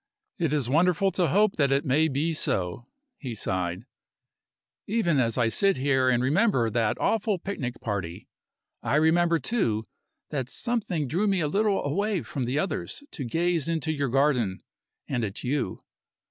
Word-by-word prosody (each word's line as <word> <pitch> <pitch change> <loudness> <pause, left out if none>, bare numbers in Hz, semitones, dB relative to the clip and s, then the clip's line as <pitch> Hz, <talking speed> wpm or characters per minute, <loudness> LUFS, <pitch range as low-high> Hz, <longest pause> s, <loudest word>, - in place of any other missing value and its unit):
"It 165 -4 +1
is 145 -5 0
wonderful 180 +7 +3
to 180 -1 +1
hope 205 +7 +2
that 140 -3 +2
it 140 +3 +2
may 150 +4 +3
be 155 +3 0
so," 95 - -1 0.3
he 125 -5 -5
sighed. 90 0 -2 1.0
"Even 185 -9 +1
as 115 -1 +1
I 120 -2 +3
sit 195 - +2
here 130 -1 +2
and 125 -1 +2
remember 140 - +2
that 110 -1 +1
awful 215 -2 +1
picnic 145 -10 -5
party, 95 -6 -4 0.5
I - - 0
remember, 165 +2 +3
too, 115 - 0 0.5
that 130 -4 -2
something 200 - -1
drew 180 +11 0
me 195 -2 +2
a 155 - +1
little 200 +4 +1
away 200 +5 0
from 135 -4 -4
the 125 +4 -1
others 195 - -2
to 140 - -5
gaze 165 +5 0
into 160 -1 -1
your 140 -3 -1
garden 125 -7 +1 0.4
and 125 -3 -1
at 100 -2 -4
you. 130 -6 -2
145 Hz, 160 wpm, -26 LUFS, 125-175 Hz, 1.0 s, wonderful